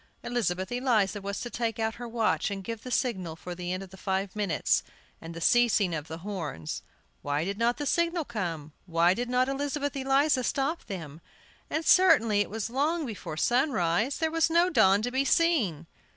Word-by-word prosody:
Elizabeth 190 -6 -1
Eliza 225 -5 +1
was 200 +1 -4
to 240 - -5
take 230 -1 -2
out 220 0 -1
her 240 - -4
watch 225 -2 0
and 195 -1 -5
give 230 +1 -5
the 255 - -8
signal 190 -10 -1
for 180 +2 -7
the 175 0 -5
end 185 +1 -3
of 190 - -13
the 190 - -12
five 190 +1 -2
minutes, 205 -5 +1 0.4
and 165 0 -8
the - - -5
ceasing 215 -1 +3
of 155 -1 -4
the 160 - -6
horns. 155 - -4 0.4
Why 145 +2 -1
did 200 +2 -4
not 235 +1 +2
the 290 - -3
signal 340 +1 +1
come? 170 - -4
Why 170 +1 +3
did 245 +4 -3
not 250 +1 +2
Elizabeth 285 +1 -2
Eliza 270 0 +2
stop 280 +7 -1
them? 165 -6 -7 0.5
And 315 +1 -2
certainly 285 - +5
it - - -2
was 225 +1 -4
long 305 +5 0
before 200 - -6
sunrise; 240 - +1
there 320 -1 0
was 330 0 +2
no 340 +2 +3
dawn 195 - +4
to 245 - -1
be 265 +2 +1
seen! 270 - +2
225 Hz, 195 wpm, -28 LUFS, 185-270 Hz, 0.5 s, certainly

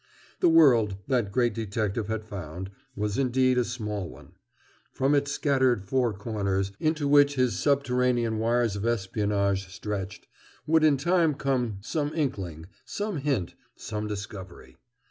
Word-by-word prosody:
The 175 - +4
world, 125 -11 +5
that 120 -6 0
great 120 0 +2
detective 105 0 -2
had 110 -1 -3
found, 95 -2 -7 0.2
was 105 +3 -2
indeed 130 -1 +2
a - - +3
small 105 -6 -4
one. - - -14 0.6
From 135 +2 +1
its 145 0 +1
scattered 130 -8 +2
four 125 +4 +1
corners, 100 -2 -2
into 155 -2 0
which 145 0 +5
his 125 -7 +1
subterranean 125 -5 +1
wires 115 -1 +1
of 100 - -4
espionage 100 -3 0
stretched, 100 -2 -5 0.4
would 160 0 +3
in 150 -3 +5
time 165 +1 +2
come 130 -7 -1
some 145 +7 -2
inkling, 95 - -3 0.2
some 205 -3 -3
hint, 135 - -1 0.2
some 105 -1 -5
discovery. 100 -3 -8
115 Hz, 140 wpm, -27 LUFS, 100-135 Hz, 0.6 s, world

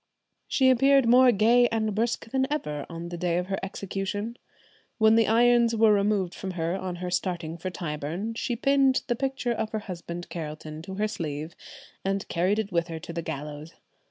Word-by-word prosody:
She 260 -1 +4
appeared 270 0 +4
more 250 +1 +7
gay 240 +3 +4
and 220 -2 -1
brisk 225 +1 -1
than 265 +1 0
ever 150 - -3
on 170 0 -6
the 175 -1 -6
day 175 -1 0
of 180 - -1
her 195 +1 -3
execution. 200 +3 -4 0.6
When 220 -1 +5
the 225 -1 +4
irons 235 +1 +4
were 220 -1 +5
removed 200 -3 +1
from 190 -1 -5
her 165 +2 -1
on 185 -2 -4
her 180 0 -5
starting 175 -3 -2
for 175 +2 -5
Tyburn, 170 +5 -4
she 235 +1 -2
pinned 275 +1 +3
the 240 - 0
picture 265 -1 -2
of 220 -1 -2
her 220 - 0
husband 175 -1 -6
Carelton 155 -1 -6
to 190 -1 -6
her 210 +2 0
sleeve, 160 -6 -5 0.5
and 195 0 -1
carried 185 +4 +1
it 215 -2 -2
with 170 -1 +1
her 165 -1 -5
to 165 +1 -8
the 170 - -3
gallows. 150 0 -6
195 Hz, 190 wpm, -27 LUFS, 170-230 Hz, 0.6 s, more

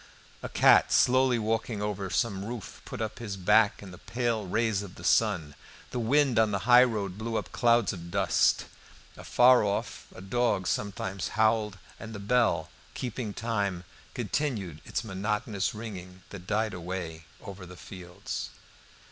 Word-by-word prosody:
A - - -5
cat - - +5
slowly 130 0 +4
walking 110 0 -1
over 100 -2 -3
some 100 -1 -1
roof 115 -2 -7
put - - -6
up 110 -1 -4
his 105 -5 -5
back 105 +3 +3
in 95 - -10
the 90 - -12
pale 115 -4 -2
rays 110 +1 +1
of 100 -3 -9
the 85 - -12
sun. 90 -7 +2 0.4
The 125 - -2
wind 130 +1 +3
on 110 -1 +4
the 100 -2 -2
highroad 110 -6 +4
blew 115 +1 -3
up - - -5
clouds 120 -3 +3
of 85 -2 -8
dust. 95 0 +2 0.5
Afar 125 -1 +5
off 100 -1 -3
a - - -9
dog 115 -1 0
sometimes 95 -2 -2
howled; 110 -2 +2 0.2
and 110 -1 -8
the - - -6
bell, 100 -6 +1 0.2
keeping 125 -3 -4
time, 100 -5 -2 0.3
continued 110 - -2
its - - -3
monotonous 105 0 -2
ringing 95 -4 -8
that 95 -2 -9
died 110 +1 0
away 85 -2 -6
over 95 -2 -9
the 90 0 -12
fields. 90 -2 -7
105 Hz, 155 wpm, -28 LUFS, 95-115 Hz, 0.5 s, cat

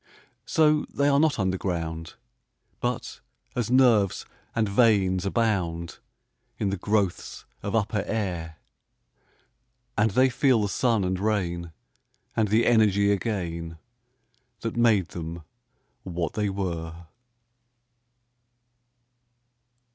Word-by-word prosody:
So, 155 -1 +3
they 140 - +1
are 140 -1 +4
not 155 -1 +3
underground, 85 -4 -2 0.6
But - - -3 0.4
as 120 -2 -1
nerves 120 -7 +3 0.3
and 110 -2 +1
veins 100 -4 +3
abound 90 -7 -1 0.6
In 100 -4 -1
the 100 - -2
growths 100 -1 -1 0.2
of 100 - -3
upper 105 -1 +1
air, 85 -7 -3 1.4
And 105 +1 +3
they 130 +6 +3
feel 125 -3 +3
the 100 - -1
sun 115 -2 +1
and 90 0 -1
rain, 90 -5 -1 0.6
And 110 - +2
the 110 +3 +3
energy 100 -3 +4
again 85 -5 -3 0.8
That 115 - -3
made 110 -7 +3
them 85 0 -6 0.6
what 85 -3 -3
they 105 -1 0
were! 85 -3 -4
100 Hz, 100 wpm, -26 LUFS, 85-115 Hz, 1.4 s, are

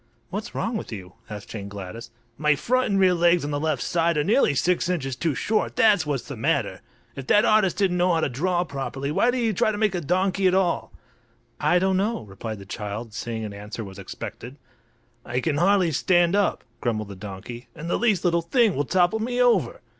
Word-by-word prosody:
"What's 205 +3 -5
wrong 230 0 -1
with - - -7
you?" 95 -4 -8 0.2
asked 105 -1 -8
Jane 100 -3 -6
Gladys. 100 +4 -8 0.3
"My 150 +2 +2
front 255 - +1
and 195 -1 +2
rear 185 -1 +5
legs 170 -2 +3
on 145 - -3
the 145 - -1
left 155 -4 -1
side 170 -2 +1
are 150 - +2
nearly 210 - +3
six 180 +4 +1
inches 135 -8 -2
too 160 +1 -1
short, 215 - -1
that's 205 -8 +4
what's 140 -5 -2
the - - -6
matter! - - -1 0.3
If 135 -1 -7
that 210 +2 +5
artist 215 -4 +3
didn't 190 -3 +1
know 180 +1 +3
how 165 -1 +2
to - - +1
draw 175 +7 0
properly 140 -2 -4
why 235 +10 +2
did 250 - 0
he 230 -3 +1
try 215 - +2
to 210 - -4
make 210 -2 +1
a 175 - -2
donkey 185 +4 +1
at 185 - +3
all?" 185 -3 0 0.7
"I 155 +4 +3
don't 190 +1 +2
know," 210 - -1
replied 110 +2 -7
the 100 - -11
child, 105 +2 -6
seeing 115 -1 -4
an 105 - -6
answer 105 +3 -7
was 95 -1 -10
expected. 120 +6 -8 0.7
"I 125 - -2
can 145 +1 -1
hardly 185 0 +3
stand 175 +4 +3
up," 205 -1 +1 0.2
grumbled 110 -4 -2
the 100 - -8
donkey; 105 +5 -8
"and 160 +2 -7
the - - 0
least 210 -5 +1
little 170 -1 +3
thing 220 +3 +2
will 145 - 0
topple 180 +7 +2
me 245 +3 -2
over." 230 - +2
170 Hz, 220 wpm, -24 LUFS, 120-190 Hz, 0.7 s, rear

